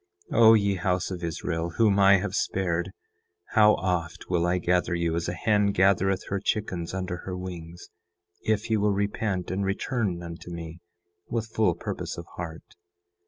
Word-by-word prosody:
10:6 - - +1
O 110 -1 +9
ye 100 -2 +2
house 90 +1 0
of 90 -2 -5
Israel 85 0 -2
whom 105 -3 +4
I 100 0 +7
have 105 +2 -3
spared, 90 -1 -1 0.6
how 105 -2 +5
oft 90 -2 -3
will 85 -1 +2
I 90 +1 +2
gather 90 0 +1
you 85 -1 0
as 85 +1 -1
a - - -2
hen 105 +3 +2
gathereth 95 -1 +2
her 100 - -1
chickens 95 -5 -2
under 95 -1 -3
her 90 +1 -6
wings, 85 -2 -8 0.6
if 110 +1 0
ye 110 - +4
will 105 0 +2
repent 100 -2 -1
and 95 +2 -1
return 100 -2 -1
unto 85 +1 -8
me 85 -1 -7 0.5
with 115 -1 -3
full 105 -7 +2
purpose - - -5
of 85 - -7
heart. 80 -2 -6
95 Hz, 170 wpm, -26 LUFS, 85-100 Hz, 0.6 s, O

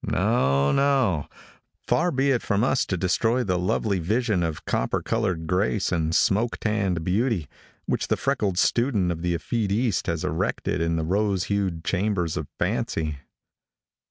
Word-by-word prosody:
No, 70 - +2
no. 135 - +2 0.6
Far 175 +2 +2
be 135 -2 +1
it 125 - +1
from 100 +2 0
us 130 +1 +1
to 95 - -1
destroy 115 +7 +1
the 90 -4 0
lovely 95 +2 0
vision 105 +2 0
of 80 -2 -3
copper - - 0
colored 95 -8 -1
grace 95 +5 0
and 80 -2 0
smoke 115 +4 +2
tanned 100 -6 0
beauty, 95 - 0 0.4
which - - -1
the - - +1
freckled 105 -10 0
student 110 -4 +2
of 85 -1 -4
the 85 0 0
effete 105 +3 -2
east 110 -5 0
has 85 -2 -1
erected 80 - -1
in 85 0 +1
the 80 -1 -1
rose 100 +1 +1
hued 95 -5 -1
chambers 90 -3 0
of 75 - -4
fancy. 75 -3 -1
95 Hz, 155 wpm, -25 LUFS, 85-115 Hz, 0.6 s, No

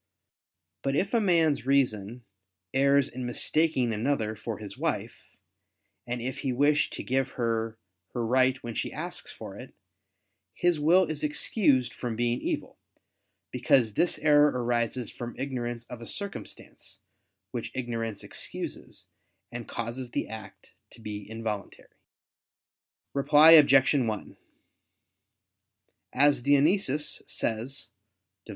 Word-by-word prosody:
But 135 0 -1
if 195 +8 0
a 230 - +3
man's 165 - +2
reason, 120 -4 +1 0.5
errs 140 0 +4
in 130 -1 -7
mistaking 125 0 +1
another 110 -1 -1
for 110 0 -5
his 100 -2 -8
wife, - - -3 0.8
and 120 0 -2
if 130 +1 -4
he 135 - -1
wish 145 +4 +2
to - - -6
give 135 +1 -1
her 115 -2 -2 0.4
her 120 -2 -2
right 130 +2 +3
when 120 -1 -5
she - - -3
asks - - -5
for - - -9
it, - - -11 0.8
his 175 -3 +1
will 170 +5 +5
is 155 -4 -4
excused 150 - +1
from 120 -3 -4
being 120 +1 0
evil: - - -4 0.7
because 115 -5 +2
this 170 +7 +2
error 150 -1 +5
arises 120 -2 -1
from 120 0 -7
ignorance 120 -3 -4
of 120 -1 -9
a 115 - -8
circumstance, 200 -1 -7 0.5
which - - -4
ignorance 115 -4 -3
excuses, - - -6 0.5
and 120 -1 -7
causes 120 +2 -5
the - - -3
act 110 -2 -10 0.2
to - - -16
be 105 -2 -7
involuntary. 110 -3 -5 1.2
Reply 150 +3 +7
Obj. 140 -4 +7
1: 115 -7 -1 1.8
As 145 -2 +3
Dionysius 145 +2 +2
says 115 +5 -3 0.6
(Div. - - -19
125 Hz, 125 wpm, -28 LUFS, 115-145 Hz, 1.8 s, Reply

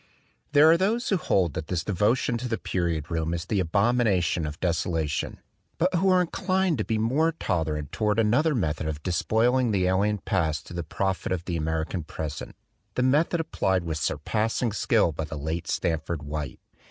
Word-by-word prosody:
There 145 +1 +7
are 165 - +5
those 225 +6 +1
who 195 - +3
hold 90 - +1
that 80 - -5
this 90 -2 -1
devotion 105 +6 +1
to 125 - -3
the 115 -2 -1
period 85 -4 -2
room 80 0 -1
is 85 +1 -4
the 100 +1 0
abomination 95 -3 +2
of 75 +1 -7
deso 85 -2 0
lation, 80 -5 -2 0.4
but 180 +3 +1
who 185 +2 +3
are 185 -1 +5
inclined 185 - 0
to - - +1
be 110 - -1
more 140 +9 +2
tolerant 80 - -2
toward 105 -1 0
another 125 +8 +3
method 80 -7 -1
of 75 -1 -4
despoiling 120 +7 +2
the 95 -4 +1
alien 100 +3 +2
past 80 -8 -1
to - - -10
the 85 - -2
profit 95 +4 -2
of 90 -2 -2
the 90 - -2
American 80 +2 -2
present, 75 -1 -6 0.4
the 125 - +1
method 150 +6 +2
applied 95 - 0
with 80 -2 -3
surpassing 110 - -1
skill 105 -3 +2
by 80 +1 -4
the 80 +1 -6
late 80 +4 -3
Stanford 80 -1 -1
White. 75 -2 -5
95 Hz, 185 wpm, -26 LUFS, 80-120 Hz, 0.4 s, There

